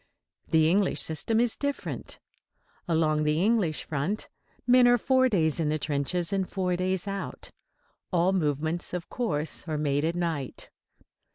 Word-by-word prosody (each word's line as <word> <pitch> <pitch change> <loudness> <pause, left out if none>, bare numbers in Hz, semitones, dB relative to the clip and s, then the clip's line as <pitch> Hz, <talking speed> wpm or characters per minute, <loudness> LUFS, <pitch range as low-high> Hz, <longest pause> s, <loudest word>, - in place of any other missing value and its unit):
The 160 -1 +4
English 190 +3 +2
system 220 +8 +2
is 240 -1 +2
different. 285 -1 -4 0.7
Along 155 -2 +2
the 150 +3 +1
English 200 -8 +1
front 160 +9 -3 0.4
men 245 0 +6
are 245 0 +5
four 260 +2 +3
days 160 - +1
in 155 -2 +1
the 155 - +1
trenches 155 +5 -1
and 190 -2 -1
four 185 -2 -1
days 185 +1 -1
out. 195 0 -5 0.6
All 180 +1 +2
movements, 160 +1 -1
of 175 -2 -6
course, 160 -11 -2
are 155 -1 -2
made 145 -1 0
at 165 +2 0
night. 165 -7 -3
175 Hz, 150 wpm, -27 LUFS, 155-200 Hz, 0.7 s, men